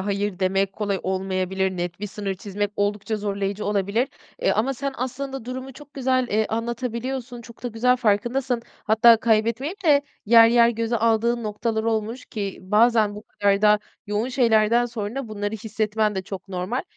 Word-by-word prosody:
hayır 200 -1 -2
demek 195 +1 +1
kolay 200 -2 -2
olmayabilir, 190 0 -1
net 175 +1 -4
bir 210 - -3
sınır 200 -1 -4
çizmek 205 +1 -3
oldukça 205 +2 -1
zorlayıcı 200 0 -3
olabilir. 205 +5 0 0.3
Eee, - - +3
ama 260 +5 0
sen 275 +2 -3
aslında 265 0 -4
durumu 260 +2 -6
çok 295 +2 -15
güzel, 255 -1 +1
eee, 215 0 +1
anlatabiliyorsun, 235 +2 -3
çok 235 0 -15
da 245 - -2
güzel 245 +2 +2
farkındasın. 240 +2 0 0.2
Hatta 225 +2 +6
kaybetmeyip 230 - 0
de 290 -3 +5 0.2
yer 230 +1 +8
yer 235 0 +5
göze 230 0 -1
aldığın 230 +1 +1
noktalar 220 +1 -2
olmuş 225 +2 -2
ki 200 -3 -5
bazen 215 +1 +3
bu 210 - -9
kadar 200 -2 0
da 210 0 +6 0.3
yoğun 210 +4 -1
şeylerden 235 -2 +3
sonra 235 +2 -5
bunları 205 0 -3
hissetmen 215 0 -1
de 190 - -2
çok 195 0 -8
normal. 185 +7 -2
220 Hz, 165 wpm, -23 LUFS, 205-240 Hz, 0.3 s, yer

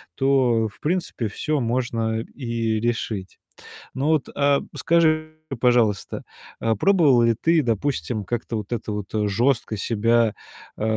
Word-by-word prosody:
то, 130 -5 +2
в 105 - -22
принципе, 165 -8 -1
всё 150 +8 -2
можно 115 -2 -1
и 115 -3 -2
решить. 110 -5 -3 0.6
Ну 135 - -2
вот, 155 -4 +2
э, 140 0 +3 0.2
скажи, 155 -2 +2 0.3
пожалуйста, 120 -5 +2 0.4
э, 115 -1 +1
пробовала 145 - +4
ли 115 -1 +3
ты, 165 -1 +4
допустим, 115 - -1
как-то 120 0 -3
вот 105 0 -7
это 110 -2 -4
вот 105 -1 -4
жёстко 110 +3 +1
себя, 115 +2 +2 0.4
э, - - -4
120 Hz, 130 wpm, -23 LUFS, 110-140 Hz, 0.6 s, пробовала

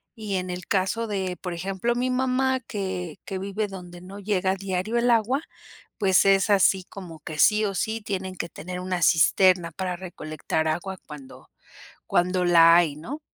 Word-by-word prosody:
y 210 -3 -4
en 185 0 -2
el 180 -1 -7
caso 200 +4 0
de 190 -3 -3
por 180 -2 -4
ejemplo 195 +7 -2
mi 250 +1 0
mamá 260 +1 +1
que 190 -8 -5
que 190 -2 -4
vive 200 +2 -3
donde 175 -2 -10
no 195 +3 -10
llega 190 -2 0
diario 195 +4 -2
el 240 +1 +2
agua 235 +6 +2 0.6
pues 190 -3 +4
es 195 +2 +4
así 190 -1 +4
como 175 -6 -10
que 155 0 -8
sí 215 +8 +4
o 195 -1 -2
sí 220 +2 -2
tienen 190 -2 -4
que 170 - -4
tener 180 +3 -7
una 180 -1 -2
cisterna 175 +1 +4
para 180 +1 -4
recolectar 160 -3 -4
agua 185 +4 -3
cuando 140 -4 -12 0.6
cuando 180 +1 +1
la 165 -1 +7
hay, 165 -5 +3
¿no? 265 - -7
190 Hz, 175 wpm, -25 LUFS, 175-210 Hz, 0.6 s, la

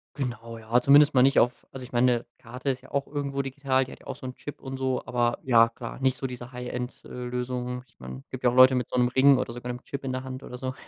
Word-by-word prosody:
Genau, 115 -4 -5
ja, 115 +2 +1
zumindest 145 +2 +6
mal 130 - +5
nicht 135 +2 +4
auf 120 0 0
also 130 - -8
ich 125 - -11
meine, 120 -1 +2
Karte 125 +3 -5
ist 130 0 -6
ja 130 - -16
auch 140 -1 0
irgendwo 140 -1 -3
digital, 135 -1 0
die - - -12
hat - - -12
ja - - -17
auch - - -4
so - - -11
'n 130 - -5
Chip 145 - -9
und 135 -1 -6
so, 130 -1 -1
aber, 120 -1 0
ja 115 -3 +5
klar, 115 0 -8
nicht 130 -1 +1
so 135 - -5
diese 125 -1 -6
High-End 125 0 -6
äh, - - -11
Lösungen. 125 0 -4
Ich - - -31
meine, 65 +1 -9
gibt 130 -1 -7
ja 125 - +5
auch 120 - -2
Leute 130 +1 +8
mit 125 -2 -1
so - - -2
'nem 125 0 +3
Ring 135 +1 +5
oder 120 -2 -3
sogar 120 0 -5
'nem 125 +1 -8
Chip 140 0 -6
in 130 - -3
der 130 0 -3
Hand 130 0 -7
oder 125 - -8
so. 130 +1 -4
125 Hz, 285 wpm, -26 LUFS, 125-135 Hz, -, Leute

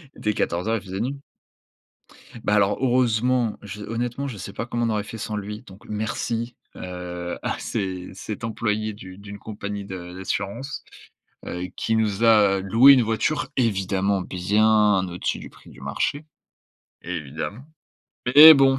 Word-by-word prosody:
Il - - -17
était 105 - 0
14:00, 100 +5 0
il - - -6
faisait 95 0 -5
nuit. 140 +4 -3 1.2
Bah, 105 - +2
alors 100 -1 +3
heureusement, 125 -2 +2
je 105 0 -8
honnêtement 120 +5 -3
je 125 -6 -6
sais 100 +1 -7
pas 115 - -4
comment 120 0 -1
on - - +1
aurait 105 -1 0
fait 115 - -8
sans 105 0 -4
lui, 105 +1 -5
donc 95 +1 -14
merci, 115 +2 -2 0.2
heu, 90 -1 -5
à - - -2
cé 95 -2 -3
cet 105 +4 -7
employé 110 -1 -1
du 95 -2 -11
d'une 100 0 -9
compagnie 100 -1 -5
d'assurance, 95 +7 -4 0.6
heu, 90 - -4
qui 110 - 0
nous 110 -1 +1
a 105 -4 +5
loué 115 +8 +7
une 130 - +5
voiture 115 +7 0
évidemment 100 -4 +1
bien 105 +1 +3
au-dessus 90 0 -2
du - - -9
prix - - -17
du 65 - -15
marché. 145 - -2 0.8
Évidemment, 85 - -5 0.6
mais 150 +6 +11
bon, 135 -1 +4
105 Hz, 155 wpm, -24 LUFS, 95-115 Hz, 1.2 s, mais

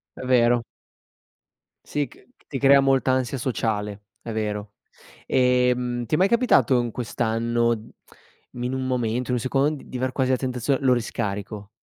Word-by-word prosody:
È - - -8
vero. 120 -1 +4 1.2
Sì 145 -1 -2
c - - -20 0.2
ti 135 - -4
crea 140 +1 +6
molta 135 -1 +2
ansia 130 0 0
sociale, 105 -4 -2 0.2
è 115 - -6
vero. 105 -1 -3 0.5
Ehm, 125 -1 +1
ti 115 - 0
è - - +1
mai 190 - +4
capitato 195 - +3
in 120 -1 -2
quest'anno 115 0 0 0.8
mhmm, 120 - -7
in 125 +1 -2
un 130 0 -2
momento, 125 -1 -1
in - - +1
un - - 0
secondo, 135 +4 +1
d 150 - -7
di 130 - -7
aver 130 +1 -1
quasi 130 0 0
la 130 - +3
tentazione: 125 +1 -1
"Lo 130 - +5
riscarico"? 105 -3 -4
125 Hz, 165 wpm, -24 LUFS, 115-130 Hz, 1.2 s, crea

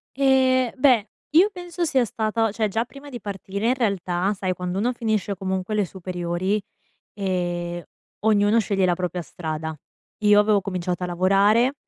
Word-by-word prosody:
Ehm, 260 -2 +3
beh, 250 -5 +4 0.2
io 360 +7 +6
penso 355 -1 -5
sia 260 -5 +2
stata 220 +1 0
cioè 220 0 0
già 225 +4 -1
prima 280 +3 -12
di 240 -3 -7
partire, 200 +1 -4
in 250 - +4
realtà, 195 -4 0
sai 185 -2 -2
quando 180 +1 -4
uno 245 +4 +1
finisce 215 -4 -1
comunque 190 +2 -3
le 205 -2 +2
superiori, 180 +2 -2 0.6
ehm, 175 -3 -2 0.4
ognuno 215 +1 +3
sceglie 195 -3 +1
la 175 - +2
propria 180 0 -3
strada. 160 -1 -5 0.4
Io 210 -1 +5
avevo 210 -1 +3
cominciato 180 -1 -3
a - - 0
lavorare, 200 +8 +3
200 Hz, 155 wpm, -23 LUFS, 180-230 Hz, 0.6 s, io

